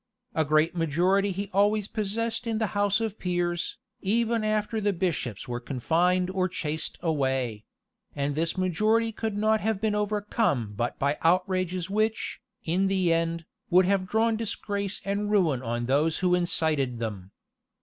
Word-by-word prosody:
A 160 - +2
great 155 +3 +2
majority 180 +5 +2
he 195 +2 -4
always 205 +1 +3
possessed 225 +2 -2
in 225 -1 0
the 220 - +1
house 205 +1 +2
of 220 -2 -3
peers, 175 -1 -1 0.2
even 230 +2 +1
after 215 +1 0
the 205 -1 +1
bishops 165 - -2
were 120 -1 -3
confined 175 +9 +1
or 185 -1 0
chased 155 -3 -4
away; 130 -8 -1 0.5
and 140 0 -1
this 165 +4 -1
majority 215 +5 +2
could 220 -1 -3
not 215 +1 +2
have 220 -2 0
been 215 0 0
overcome 210 - 0
but 120 +3 -2
by 140 +2 0
outrages 185 +1 +1
which, 215 +2 -1 0.2
in 185 +4 +1
the 185 -3 +2
end, 165 0 -1 0.2
would 180 +1 +5
have 190 0 +1
drawn 220 +3 +2
disgrace 200 -2 -3
and 200 +1 -1
ruin 170 -11 +2
on 120 -1 -2
those 145 +5 +2
who 180 -1 +2
incited 160 -7 +1
them. 105 -5 -5
185 Hz, 155 wpm, -27 LUFS, 155-210 Hz, 0.5 s, would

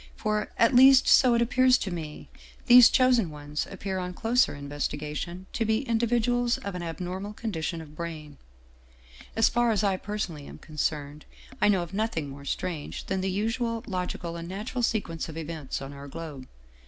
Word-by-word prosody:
For, 215 0 -1
at 230 +3 +4
least 260 +1 +7
so 250 -3 +6
it 235 - +3
appears 255 +2 +4
to 195 - -4
me, 155 -3 -7 0.4
these 250 -1 +9
chosen 250 -7 +3
ones 150 0 -5
appear 195 -1 -4
on 180 0 -5
closer 235 - +2
in 140 0 -8
vestigation 150 +5 -4
to 230 - 0
be 220 +3 +1
individuals 240 +1 +1
of 200 - -6
an 180 - -5
abnormal 180 +4 -5
condition 170 -7 -4
of 150 -1 -13
brain. 155 -3 -7 1.0
As 225 0 +4
far 240 0 +2
as 215 -2 +1
I 195 -2 +2
personally 185 -8 -5
am - - -10
concerned, 150 -1 -4 0.4
I 210 - +5
know 195 -4 +3
of 175 +2 -10
nothing 195 -8 -2
more 140 +1 -10
strange 155 +1 -4
than 190 0 -2
the 190 - -1
usual 225 +3 -1
logical 180 -3 -4
and 170 0 -7
natural 215 +6 -4
sequence 200 -9 -1
of 160 - -8
events 155 -4 -5
on 135 +1 -8
our 140 0 -9
globe. 140 -3 -8
185 Hz, 180 wpm, -27 LUFS, 155-225 Hz, 1.0 s, these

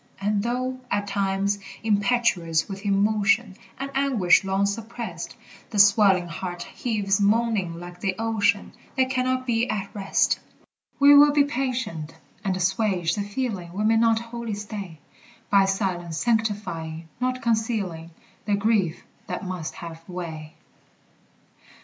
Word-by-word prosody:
And 205 +1 0
though, 255 +3 -2
at 205 0 0
times, 200 0 0 0.2
impetuous 200 -6 +2
with 195 +1 -6
emotion 205 +1 +2 0.2
And 275 +1 -4
anguish 255 -12 +3
long 195 +1 +1
suppressed, 225 +3 -5 0.3
The 215 - -5
swelling 200 -3 +5
heart 175 +1 -5
heaves 205 -4 -1
moaning 205 -5 +1
like 175 0 -10
the 195 -3 -1
ocean, 220 -3 +1 0.2
That 260 0 +2
cannot 255 0 0
be 235 -1 +1
at 200 -1 -3
rest, 195 -2 +1 0.6
We 285 +1 +8
will 290 +1 +8
be 290 0 +4
patient, 250 - -3 0.3
and 190 -2 0
assuage 185 -2 +1
the 205 - -1
feeling 200 -5 -4
We 205 +3 -2
may 220 +1 +4
not 225 0 +4
wholly 230 -1 -5
stay; 205 -5 -7 0.5
By 195 -1 +6
silence 185 -4 -2
sanctifying, 190 -9 -1
not 255 0 -1
concealing, 220 -8 -1 0.4
The 205 - +2
grief 200 -5 +1 0.2
that - - -4
must 180 -4 -5
have 165 -1 -9
way. 160 -4 -7
205 Hz, 130 wpm, -25 LUFS, 185-230 Hz, 0.6 s, We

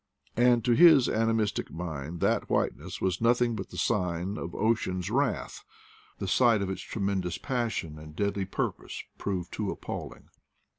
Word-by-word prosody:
And 120 -1 +4
to 125 - +3
his 150 -1 +7
animistic 110 -2 0
mind 80 -1 -5
that - - +1
whiteness - - -1
was 95 +1 0
nothing 120 0 +3
but - - -6
the - - -9
sign 90 -2 0
of 85 - -6
ocean's 95 -4 0
wrath 135 +1 -1 0.3
— - - -27
the 100 - -4
sight 115 +1 +4
of 95 - -2
its 95 - -5
tremendous 95 -4 -2
passion 115 - -2
and 75 0 -11
deadly 100 0 -1
purpose 95 - -4 0.2
proved 90 -3 -3
too - - -2
appalling. - - -6
100 Hz, 155 wpm, -28 LUFS, 90-115 Hz, 0.3 s, his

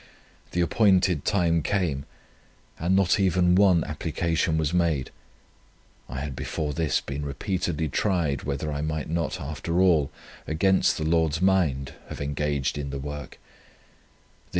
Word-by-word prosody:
The 90 - -1
appointed 90 -4 +3
time 85 -5 +2
came, 80 -8 -1 0.7
and 85 +4 +1
not 95 0 +3
even 90 -2 +3
one 90 -3 +5
application 80 +1 -1
was 80 0 0
made. 85 -7 +1 1.0
I 65 +3 -4
had 70 -2 -5
before 75 +2 -3
this 80 -1 0
been 70 +2 -5
repeatedly 80 +2 -2
tried, 80 -4 0
whether 75 +2 -3
I 70 - -3
might 75 -1 -3
not, 85 -1 -1
after 75 +4 -3
all, 80 -7 +4 0.4
against 95 +5 +2
the 80 - -2
Lord's 80 -1 +2
mind, 80 -8 +1 0.2
have - - -7
engaged 70 0 -1
in 70 -1 -4
the 70 - -4
work. 70 -1 -7
80 Hz, 135 wpm, -26 LUFS, 75-90 Hz, 1.0 s, one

